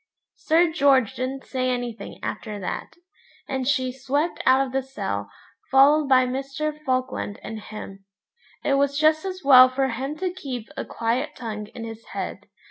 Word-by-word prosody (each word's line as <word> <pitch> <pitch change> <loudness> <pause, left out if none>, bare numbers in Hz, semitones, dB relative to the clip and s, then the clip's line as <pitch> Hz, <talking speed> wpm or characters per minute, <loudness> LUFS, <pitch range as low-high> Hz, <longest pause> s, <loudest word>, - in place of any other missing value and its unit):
Sir 330 +1 +3
George 270 -7 +3
didn't 265 +1 -4
say 255 -1 -1
anything 245 -2 -4
after 210 -2 -4
that, 185 - -5 0.5
and 265 -2 -2
she 260 -2 +1
swept 275 +6 -1
out 260 +1 +5
of 260 - -9
the 270 - +1
cell, 265 +1 -4 0.4
followed 280 +2 +5
by 255 -1 +6
Mr. 275 +4 -3
Falkland 255 -6 -2
and 220 - -6
him. 200 -2 -9 0.6
It 275 -1 +2
was 280 0 +1
just 310 +2 +3
as 370 -1 -5
well 255 -2 +9
for 265 +1 0
him 270 +5 -4
to 365 +2 -1
keep 260 -10 -6
a - - -4
quiet 240 +6 -2
tongue 215 -3 -5
in 230 - -6
his 225 0 -8
head. - - -5
265 Hz, 165 wpm, -24 LUFS, 245-285 Hz, 0.6 s, well